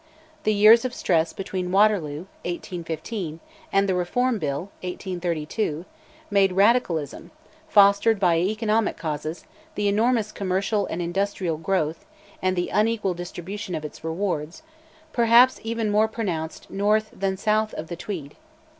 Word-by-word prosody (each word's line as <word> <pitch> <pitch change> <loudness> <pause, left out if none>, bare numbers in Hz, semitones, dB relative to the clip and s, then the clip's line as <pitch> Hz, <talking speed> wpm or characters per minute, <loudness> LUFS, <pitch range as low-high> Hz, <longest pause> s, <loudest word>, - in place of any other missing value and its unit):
The 215 - +4
years 215 +3 +7
of 255 -1 -3
stress 165 -3 +1
between 185 -2 -4
Waterloo 190 -7 +2 0.2
(1815) 170 0 -5 0.3
and 195 0 +3
the 190 - +1
Reform 225 +7 0
Bill 150 +5 -3
(1832) 175 -2 -3 0.5
made 195 -2 +3
Radicalism 190 - +1 0.4
(fostered 200 -1 +5
by 175 -4 +3
economic 215 +3 0
causes, 155 0 -4 0.3
the 205 0 0
enormous 220 +1 +2
commercial 195 +2 -1
and 175 - -3
industrial 180 -2 -1
growth, 160 -2 -1 0.4
and 185 0 +1
the 175 0 -1
unequal 215 -3 +1
distribution 175 +2 -6
of 155 - -4
its 150 - -9
rewards) 165 - -3 0.5
perhaps 240 +2 +5
even 225 -1 -1
more 215 +1 +4
pronounced 180 -8 -4
north 215 +2 +1
than 190 -1 -2
south 215 +2 +1
of 155 - -5
the 170 - -6
Tweed. 165 -6 -6
195 Hz, 130 wpm, -24 LUFS, 170-215 Hz, 0.5 s, years